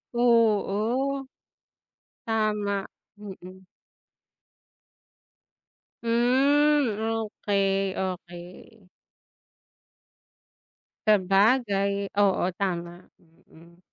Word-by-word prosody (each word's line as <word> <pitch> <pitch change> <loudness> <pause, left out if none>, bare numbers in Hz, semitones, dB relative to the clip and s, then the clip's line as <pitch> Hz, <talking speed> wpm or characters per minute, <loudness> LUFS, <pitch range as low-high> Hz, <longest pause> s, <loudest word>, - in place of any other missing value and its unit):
oo. 235 +3 +1 1.0
Tama, 210 -2 0 0.4
mm. 190 -2 -11 2.4
Hmm, 265 +2 +2
okey, 200 -3 -1
okey. 180 +3 -8 2.2
Sabagay, 200 0 +2
oo, 190 -2 +2
tama, 175 -2 -4 0.4
hmm. 170 +2 -19
205 Hz, 45 wpm, -26 LUFS, 190-230 Hz, 2.4 s, Hmm